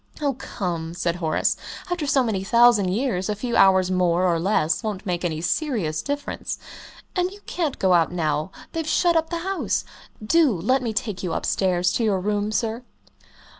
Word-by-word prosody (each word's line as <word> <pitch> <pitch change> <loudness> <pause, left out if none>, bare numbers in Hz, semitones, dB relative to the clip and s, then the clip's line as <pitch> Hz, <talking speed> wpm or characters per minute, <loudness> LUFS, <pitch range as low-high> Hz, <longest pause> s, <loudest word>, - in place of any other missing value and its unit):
"Oh, 285 -2 0
come!" 175 -9 -4
said 175 -1 -1
Horace, 160 -3 +1 0.4
"after 340 -4 -1
so 275 -2 +3
many 210 -5 -1
thousand 235 -2 +5
years, 200 -2 -1
a 210 - 0
few 235 +3 -3
hours 190 -1 +5
more 180 -1 +2
or 170 -2 +2
less 165 -3 +1
won't 210 -2 -4
make 180 -2 -2
any 160 -3 -2
serious 175 - -1
difference. 285 0 -4 0.6
And 360 -1 +1
you 400 +2 -13
can't 320 -6 -2
go 190 -1 +3
out 165 -2 +3
now 155 -2 -1 0.2
they've 325 -1 -3
shut 345 -2 +3
up 325 0 +1
the 340 - -2
house. 380 +3 -2 0.4
Do 320 +3 +4
let 255 +9 +2
me 235 -3 -2
take 210 -2 -3
you 180 -3 -2
upstairs 180 -2 +1
to 235 - 0
your 205 -4 +2
room, 205 +2 -1
sir." 225 +2 -1
205 Hz, 180 wpm, -23 LUFS, 180-265 Hz, 0.6 s, thousand